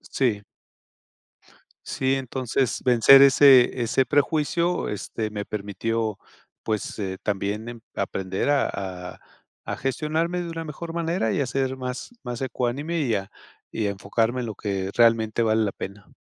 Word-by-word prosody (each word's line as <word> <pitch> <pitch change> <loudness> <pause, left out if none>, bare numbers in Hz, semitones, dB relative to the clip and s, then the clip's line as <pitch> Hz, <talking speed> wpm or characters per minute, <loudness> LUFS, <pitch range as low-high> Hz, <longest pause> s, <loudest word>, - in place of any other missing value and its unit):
Si. 115 -6 -1 1.4
Sí, 130 0 0
entonces 130 -1 -1
vencer 125 +2 +7
ese 130 -2 +6
ese 125 +3 +2
prejuicio, 160 +5 +1
este, 105 +1 -4
me 105 -1 -4
permitió, 105 +1 -3 0.5
pues, 110 -2 -3 0.3
también 105 +4 -3
aprender 95 +7 -2
a 145 -1 +2 0.5
a - - -19 0.5
a - - -4
gestionarme 155 +6 -1
de 170 - -5
una 165 0 -5
mejor 165 +2 -7
manera 165 - 0
y - - 0
a - - +1
ser 130 +1 -1
más 125 -1 -5
más 120 -1 -5
ecuánime 135 +6 -2
y 125 -6 0
a 100 +1 -4 0.4
y 110 - -2
a - - 0
enfocarme 115 +5 -1
en 120 - -4
lo 110 - -5
que 95 -2 -3
realmente 115 -1 +3
vale 110 0 +2
la 100 - 0
pena. 100 +1 -8
120 Hz, 145 wpm, -24 LUFS, 110-140 Hz, 1.4 s, vencer